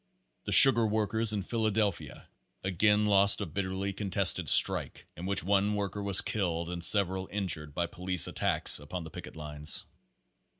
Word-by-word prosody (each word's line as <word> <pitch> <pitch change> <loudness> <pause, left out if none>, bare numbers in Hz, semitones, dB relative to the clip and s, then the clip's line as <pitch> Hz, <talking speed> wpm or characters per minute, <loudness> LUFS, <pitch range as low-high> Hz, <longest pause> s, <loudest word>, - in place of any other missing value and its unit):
The - - -7
sugar 130 -4 +10
workers 110 +1 -2
of 100 -3 -5
Philadelphia 110 -3 -5 0.4
again 105 +3 -2
lost 100 -1 +1
a 100 - -6
bitterly 95 +3 -7
contested 100 -2 -1
strike - - +1
in 90 +3 -10
which 100 -1 -3
one 100 +2 -2
worker 100 0 -7
was 100 -2 +2
killed 85 -5 -6
and 85 -1 -6
several 95 0 +2
injured 80 -7 -7
by 85 - -4
police 90 -2 -2
attacks - - -2
upon 80 +4 -10
the 80 - -14
picket - - -13
lines. 75 -1 -3
95 Hz, 155 wpm, -26 LUFS, 85-105 Hz, 0.4 s, sugar